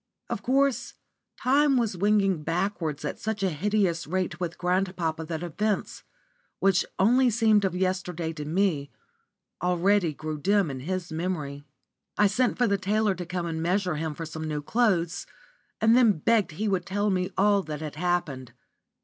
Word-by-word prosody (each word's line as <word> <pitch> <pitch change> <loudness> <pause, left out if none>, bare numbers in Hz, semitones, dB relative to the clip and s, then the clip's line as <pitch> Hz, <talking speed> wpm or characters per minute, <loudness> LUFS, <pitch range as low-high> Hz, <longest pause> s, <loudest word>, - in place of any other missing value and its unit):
Of - - -2
course 275 +1 +1 0.5
time 275 +1 +4
was 225 -5 0
winging 195 -2 +2
backwards 165 -2 -2
at - - -4
such 220 -3 -3
a 190 - +2
hideous 180 0 0
rate 185 +2 -2
with 175 -2 -4
grandpapa 180 -3 -1
that 160 +1 -4
events, 200 +5 -2 0.6
which 195 -2 +3
only 245 +6 +4
seemed 220 -2 +3
of 185 -2 -1
yesterday 180 -3 -2
to 150 -2 -6
me, 155 -3 0 0.7
already 180 0 +2
grew 155 +1 -5
dim 195 -1 +2
in 130 - -6
his 180 +4 -4
memory. 155 -4 -3 0.5
I 210 - +5
sent 240 +5 +1
for 245 - +3
the 200 -3 +1
tailor 210 +2 +1
to 180 -2 -7
come 180 -1 -3
and 160 -1 -3
measure 180 -1 0
him 155 -1 -3
for 165 - -5
some 160 0 -6
new 150 -1 -3
clothes, 175 -5 +1 0.5
and 225 +1 +5
then 240 -4 +6
begged 205 +1 +1
he 215 +7 -2
would 185 -3 -1
tell 205 +2 0
me 185 0 0
all 200 0 +4
that 150 -4 -6
had 155 -2 -5
happened. 155 -8 -2
185 Hz, 165 wpm, -27 LUFS, 160-205 Hz, 0.7 s, then